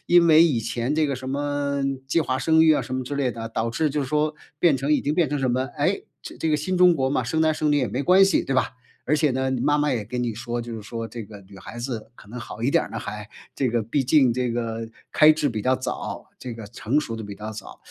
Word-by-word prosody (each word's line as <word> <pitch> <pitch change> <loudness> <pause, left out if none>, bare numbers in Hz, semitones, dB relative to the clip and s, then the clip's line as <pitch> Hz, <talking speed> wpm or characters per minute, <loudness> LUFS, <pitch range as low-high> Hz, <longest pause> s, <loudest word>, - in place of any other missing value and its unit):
因 175 -1 +6
为 160 0 +7
以 150 -9 +2
前 120 +4 -2
这 155 -1 +2
个 140 - -1
什 130 +1 -7
么， 145 0 -1 0.2
计 150 +5 +2
划 130 -3 -1
生 160 +2 +4
育 160 - +6
啊 - - +2
什 130 - -5
么 130 - -1
之 140 +3 -4
类 135 -3 +1
的， 115 -1 -6
导 115 0 -1
致 150 +6 0
就 150 - -1
是 135 - -4
说， 150 +1 +1 0.2
变 160 -4 +4
成 135 +3 -2
已 150 - +3
经 145 +2 0
变 165 -4 +2
成 145 - -1
什 130 -2 +1
么， 130 +2 0
诶， - - 0 0.2
这 - - -9
这 160 - -1
个 150 - +3
新 180 +5 -2
中 180 -1 +6
国 135 -3 0
嘛， 135 - +1
生 160 +7 -1
男 160 0 +3
生 155 -1 0
女 - - +3
也 125 - 0
没 125 +7 -2
关 185 +6 +6
系， 195 - +2
对 135 - -2
吧？ 130 - +1 0.4
而 150 - +4
且 150 -1 +2
呢， 130 +1 -1
你 130 -2 -1
妈 145 +3 +2
妈 150 - +1
也 115 -4 -2
跟 125 +4 -4
你 120 -3 -2
说， 120 +1 -4
就 120 0 -6
是 110 - -7
说 115 +2 -5
这 115 +1 -7
个 105 -1 -11
女 95 +1 -15
孩 115 +7 -9
子 120 -3 -5
可 - - -16
能 120 +4 -8
好 110 - -9
一 130 +5 0
点 - - +4
儿 - - -8
呢 - - -4
还， 105 0 -7 0.3
这 130 - 0
个， 120 0 +1
毕 115 +6 -1
竟 130 -1 +4
这 125 0 -1
个 115 -1 -3 0.3
开 155 0 +7
智 155 -2 +2
比 110 -4 -3
较 130 0 +2
早， 130 - -5
这 125 - -6
个 115 -2 -8
成 115 +6 -1
熟 115 -6 -5
得 110 - -6
比 100 -1 -7
较 105 +1 -6
早。 105 -2 -10
130 Hz, 315 characters per minute, -24 LUFS, 115-150 Hz, 0.4 s, 为